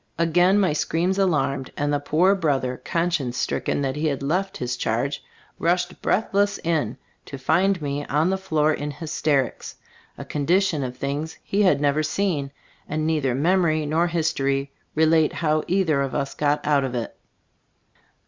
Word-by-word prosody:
Again 175 +4 +3
my 185 -6 +2
screams 175 +5 0
alarmed, 140 -8 0
and 145 0 0
the 145 - +1
poor 160 +7 +3
brother, 135 -8 -1
conscience 165 -8 -1
stricken 140 - -1
that 135 -1 -1
he 155 +1 -1
had 140 -2 -2
left 190 +7 -1
his 125 0 -2
charge, 125 +4 -2 0.4
rushed 180 +1 0
breathless 205 -1 +1
in, 145 -8 0 0.3
to 140 - -7
find 180 +8 +2
me 145 0 -2
on 155 +6 +1
the 190 - 0
floor 155 -5 +1
in 150 0 -4
hysterics, 145 -3 -1 0.4
a - - -7
condi 150 +6 +2
tion 155 -6 -2
of 125 -1 -5
things 145 +4 -3
he 200 - 0
had 185 -8 +4
never 145 +1 +2
seen; 155 -2 -1 0.4
and 155 +1 -1
neither 150 -6 +1
memory 160 0 +2
nor 160 +4 +1
history 140 -5 -1 0.2
relate 160 0 +3
how 155 -2 0
either 170 -6 +2
of 135 -1 -2
us 140 0 -2
got 150 0 0
out 145 -2 +3
of 130 -2 -3
it. 120 -2 -4
155 Hz, 165 wpm, -23 LUFS, 140-175 Hz, 0.4 s, had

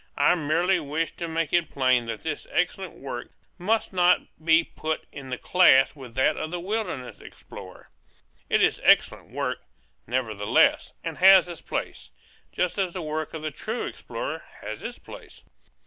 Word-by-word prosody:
I 145 - +5
merely 175 +3 +1
wish 155 +2 -3
to 170 - -4
make 165 -2 -2
it 175 -2 +2
plain 130 -3 +2
that 115 -2 -5
this 155 -2 -4
excellent 180 +1 -1
work 125 -3 -7 0.3
must 215 +4 0
not 180 0 +4 0.2
be 165 +1 +5
put 160 -1 -4
in 135 -2 -9
the 125 - -3
class 155 -8 +5
with 130 -5 -11
that 130 - +2
of 155 - -3
the 175 +1 -4
wilderness 180 - -4
explorer. - - -12 0.6
It - - +3
is - - +2
excellent - - +3
work, - - -3 0.5
nevertheless, 110 -4 +1
and - - -5
has 190 -1 +8
its 175 -2 -8
place, 65 - -5 0.4
just 180 +2 -1
as 185 -3 0
the 180 - -5
work 155 +1 -4
of 155 - -6
the 155 - -2
true 220 - -4
explorer - - -5 0.2
has - - -6
its - - -6
place. - - -13
160 Hz, 165 wpm, -25 LUFS, 135-180 Hz, 0.6 s, has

